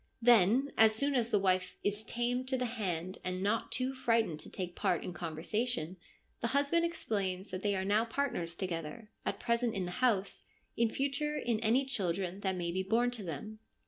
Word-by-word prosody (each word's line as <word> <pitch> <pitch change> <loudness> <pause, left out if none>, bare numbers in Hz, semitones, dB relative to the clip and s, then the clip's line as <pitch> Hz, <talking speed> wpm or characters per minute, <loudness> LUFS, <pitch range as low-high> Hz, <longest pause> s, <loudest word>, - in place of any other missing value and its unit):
Then, 240 +3 +5
as 220 0 +7
soon 280 +5 +1
as 240 -3 +2
the 215 - +3
wife 185 -2 +1
' - - -39
is 205 +1 -1
tamed 245 +3 -1
to 260 0 0
the 250 - 0
hand, 185 -6 -3
and 185 +1 -2
not 210 +3 0
too 255 +1 +1
frightened 230 -10 +1
to - - -8
take 180 -2 -5
part 175 - +1
in 180 - -5
con 165 -2 -5
versation,' 185 -1 -2 0.4
the 235 - 0
husband 290 +4 +2
explains 200 - -2
that 185 0 -4
they 205 -1 +1
are 190 0 -1
now 210 +3 +3
partners 225 -9 -2
together, 175 +4 -5 0.2
at - - -1
present 235 -1 0
in 190 -2 -1
the 175 - -4
house, 205 -6 +2 0.3
in 235 -1 +2
future 280 +4 -1
in 235 -5 0
any 230 +5 +3
children 190 -6 -1
that 190 -2 -1
may 175 -1 -2
be 185 +2 0
born 230 +6 +2
to 240 -3 -5
them. 190 +6 -6
215 Hz, 205 wpm, -33 LUFS, 185-245 Hz, 0.4 s, as